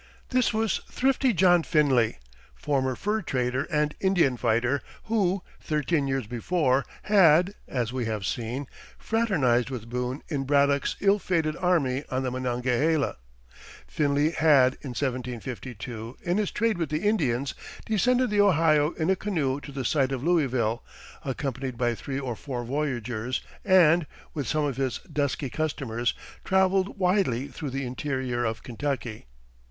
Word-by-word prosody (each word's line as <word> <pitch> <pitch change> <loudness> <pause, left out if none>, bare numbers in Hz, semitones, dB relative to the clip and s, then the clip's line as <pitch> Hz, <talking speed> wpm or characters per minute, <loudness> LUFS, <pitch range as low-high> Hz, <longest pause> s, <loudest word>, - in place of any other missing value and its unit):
This 255 -2 +2
was 220 -2 0
thrifty 265 0 +2
John 175 -3 +5
Finley, 140 -9 +2 0.4
former 135 -3 0
fur 210 - -1
trader 130 -4 -1
and 150 -2 0
Indian 180 -9 +3
fighter, 120 +4 +1 0.2
who, 195 -4 0 0.2
thirteen 150 -1 0
years 135 -3 -1
before, 130 - +1 0.2
had, 185 -2 +5
as 125 -2 -2
we 130 -2 -2
have 110 -3 -3
seen, 120 +8 -3 0.3
fraternized 150 - +1
with 120 -3 -7
Boone 125 +3 -3
in 140 -4 -2
Braddock's 140 0 +2
ill 200 +1 +4
fated 160 -5 0
army 150 -8 +1
on 130 0 -1
the 130 - -1
Monongahela. 130 - 0 0.7
Finley 145 +1 +1
had, 140 -6 +5
in 130 -4 -7
1752, 125 -2 -5
in 175 +2 0
his 210 - 0
trade 225 -4 0
with 165 - -1
the 155 +1 -2
Indians, 140 - +1 0.3
descended 245 +3 +2
the 205 -1 +4
Ohio 160 -5 +4
in 160 +3 0
a - - +3
canoe 155 -9 -1
to 145 - -9
the 135 -2 -4
site 135 0 +2
of 130 -1 -3
Louisville, 130 -9 +1 0.4
accompanied 135 -2 -3
by 120 -1 +1
three 135 +4 -4
or 130 -4 -3
four 125 0 -5
voyageurs, 125 -3 -2 0.2
and, 175 -4 +5 0.3
with 145 -5 -3
some 155 -1 +1
of 135 -3 -2
his 135 -2 -1 0.2
dusky 140 -2 -1
customers, 130 -7 -1 0.3
traveled 190 +1 +2
widely 180 - +1
through 145 +2 -6
the 135 +1 -3
interior 130 -1 -2
of 110 -1 -2
Kentucky. 120 - -4
140 Hz, 145 wpm, -26 LUFS, 125-175 Hz, 0.7 s, John